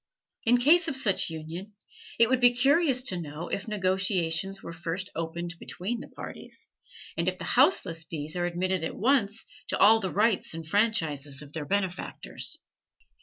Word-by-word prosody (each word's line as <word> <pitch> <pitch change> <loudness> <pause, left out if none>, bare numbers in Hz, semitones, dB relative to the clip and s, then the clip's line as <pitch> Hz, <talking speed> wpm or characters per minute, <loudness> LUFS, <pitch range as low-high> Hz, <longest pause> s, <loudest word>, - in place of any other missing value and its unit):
In 240 +2 +5
case 320 +7 +5
of 275 -4 +2
such 200 -10 +3
union, 165 +6 -7 0.4
it 230 - +6
would 260 +1 +2
be 245 -1 +5
curious 275 0 +3
to 185 -8 -2
know 155 +2 -7
if 200 - -3
negotiations 190 -2 0
were 170 - -7
first 170 +3 -4
opened 170 +1 -4
between 220 +6 -3
the - - -9
parties, - - -9 0.5
and - - +1
if - - -6
the - - -7
houseless 165 - +2
bees 155 -1 -6
are 175 0 0
admitted 180 0 -1
at 160 - -3
once 225 -3 +1 0.2
to - - -1
all 220 +3 +6
the 190 -4 -2
rights 210 -5 +1
and 165 0 -6
franchises 155 -8 +1
of 145 0 -14
their 155 -2 -4
benefactors. 190 0 -3
190 Hz, 170 wpm, -28 LUFS, 165-225 Hz, 0.5 s, it